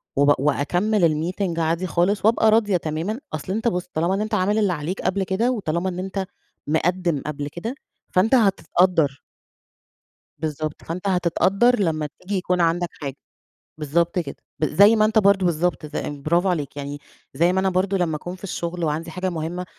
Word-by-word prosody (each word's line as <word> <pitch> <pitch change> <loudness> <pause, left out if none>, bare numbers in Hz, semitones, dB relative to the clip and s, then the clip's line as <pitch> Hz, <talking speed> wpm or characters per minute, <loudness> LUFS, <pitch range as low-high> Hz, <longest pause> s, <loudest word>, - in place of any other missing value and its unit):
و 145 +1 +4
وأكمل 170 +2 +1
الmeeting 175 -5 -2
عادي 165 +3 0
خالص، 180 +4 +1
وأبقى 220 0 +4
راضية 210 -4 +3
تمامًا. 165 +8 -3
أصل 155 +5 -3
أنت 225 +2 -1
بُص، 180 -5 0
طالما 180 +6 0
أنت 215 - -6
عامل 205 +1 +2
اللي 205 -4 +2
عليك 165 +4 -4
قبل 190 +2 0
كده، 200 +7 0
وطالما 190 -5 -1
إن 180 0 -5
أنت 190 +1 -3 0.4
مقدم 170 -1 0
قبل 145 -1 -4
كده، 200 - -5 0.3
فأنت 215 +8 +3
هتتقدر. 175 - +2 1.2
بالضبط 155 -1 -4
فأنت 180 +4 -4
هتتقدر 195 +6 +2
لما 155 -5 0
تيجي 195 +2 -3
يكون 180 -1 0
عندك 170 +1 +1
حاجة 140 -3 -6 0.6
بالضبط 170 +4 +1
كده، 150 -5 -5 0.3
زي 200 +7 +6
ما 215 -1 +4
أنت 220 +1 +3
برضو 200 -2 +4
بالضبط 170 -1 0
ز - - -9
برافو 155 +6 0
عليك، 150 -6 -2
يعني 145 0 -5 0.3
زي 170 +6 +2
ما 190 - +2
أنا 190 0 +2
برضو 185 +2 0
لما 170 -4 0
أكون 175 +4 -7
في 185 - -19
الشغل 175 -2 -4
وعندي 160 +2 -2
حاجة 185 +3 -2
مهمة 170 +2 -4
180 Hz, 170 wpm, -23 LUFS, 160-195 Hz, 1.2 s, زي